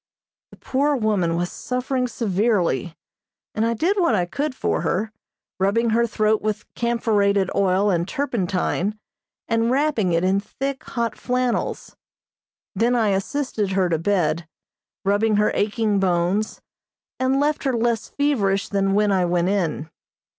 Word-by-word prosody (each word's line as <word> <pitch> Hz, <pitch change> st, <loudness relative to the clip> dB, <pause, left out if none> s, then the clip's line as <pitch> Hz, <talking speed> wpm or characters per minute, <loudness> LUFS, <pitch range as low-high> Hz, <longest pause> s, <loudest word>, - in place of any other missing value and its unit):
The -, -, -16 dB
poor 285 Hz, +2 st, 0 dB
woman 205 Hz, -8 st, +1 dB
was 175 Hz, +1 st, -2 dB
suffering 250 Hz, 0 st, -2 dB
severely, 200 Hz, -, 0 dB, 0.6 s
and 215 Hz, -, 0 dB
I 230 Hz, +1 st, +1 dB
did 365 Hz, -, +1 dB
what 335 Hz, -11 st, +3 dB
I 180 Hz, -3 st, +1 dB
could 280 Hz, +9 st, -3 dB
for -, -, -1 dB
her, 190 Hz, +6 st, -1 dB, 0.5 s
rubbing 220 Hz, +5 st, +2 dB
her 235 Hz, +1 st, +2 dB
throat 215 Hz, -1 st, +1 dB
with 215 Hz, 0 st, -2 dB
camphorated 205 Hz, -5 st, +1 dB
oil 195 Hz, +1 st, +2 dB
and 170 Hz, -1 st, 0 dB
turpentine 205 Hz, -6 st, -1 dB, 0.5 s
and 230 Hz, 0 st, +1 dB
wrapping 260 Hz, -8 st, +1 dB
it 165 Hz, +1 st, +1 dB
in 190 Hz, +1 st, +2 dB
thick, 270 Hz, +6 st, -5 dB
hot 235 Hz, -3 st, -2 dB
flannels. 250 Hz, -1 st, -2 dB, 0.8 s
Then 235 Hz, +5 st, +2 dB
I 225 Hz, -3 st, +2 dB
assisted 205 Hz, 0 st, -1 dB
her 190 Hz, -2 st, +2 dB
to 165 Hz, -2 st, 0 dB
bed, 165 Hz, -3 st, 0 dB, 0.6 s
rubbing 205 Hz, +2 st, +2 dB
her 210 Hz, +1 st, +3 dB
aching 210 Hz, 0 st, +1 dB
bones, 185 Hz, +3 st, 0 dB, 0.6 s
and 260 Hz, +1 st, +2 dB
left 295 Hz, +1 st, 0 dB
her 265 Hz, -, +1 dB
less 230 Hz, -1 st, 0 dB
feverish 210 Hz, -10 st, 0 dB
than 195 Hz, -1 st, +1 dB
when 210 Hz, 0 st, +3 dB
I 185 Hz, -2 st, +2 dB
went 175 Hz, +1 st, +1 dB
in. 170 Hz, -6 st, -1 dB
210 Hz, 145 wpm, -22 LUFS, 190-240 Hz, 0.8 s, what